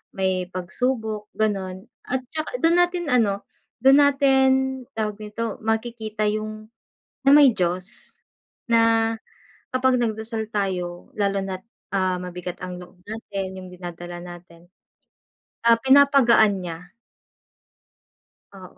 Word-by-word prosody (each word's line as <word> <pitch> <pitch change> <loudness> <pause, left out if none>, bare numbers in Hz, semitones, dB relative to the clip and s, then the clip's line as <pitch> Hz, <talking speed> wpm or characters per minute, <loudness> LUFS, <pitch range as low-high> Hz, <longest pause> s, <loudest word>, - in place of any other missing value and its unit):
may 185 -1 0
pag-subok 215 +4 -2
gano’n. 195 -3 -1 0.2
At 260 +1 -1
tsaka 315 +10 -3
dun 335 +1 +4
natin 350 -2 0
ano, 215 -6 +1 0.4
dun 270 +1 +7
natin, 270 -2 +4 0.5
tawag 215 -1 -2
nito, 215 +1 -4
makikita 220 -1 -2
yung 215 0 -5 0.6
na - - +7
may 290 -2 +8
Diyos. 180 +1 -3 0.6
Na, 225 -1 +4 0.6
kapag 255 0 +3
nag-dasal 220 -1 -2
tayo 180 -3 -3
lalo 200 -1 +1
na't, 185 -1 -5 0.3
ah, 185 -2 +1
mabigat 180 0 -6
ang 180 -1 -6
loob 180 +1 -16
natin, 195 -3 -5
yung 185 0 -9
dinadala 175 -1 -8
natin, 175 -1 -13 1.0
ah, 230 -1 +6
pinapagaan 260 -7 +5
niya. 175 0 -8 1.6
Oo. 185 -2 -13
215 Hz, 110 wpm, -23 LUFS, 185-235 Hz, 1.6 s, may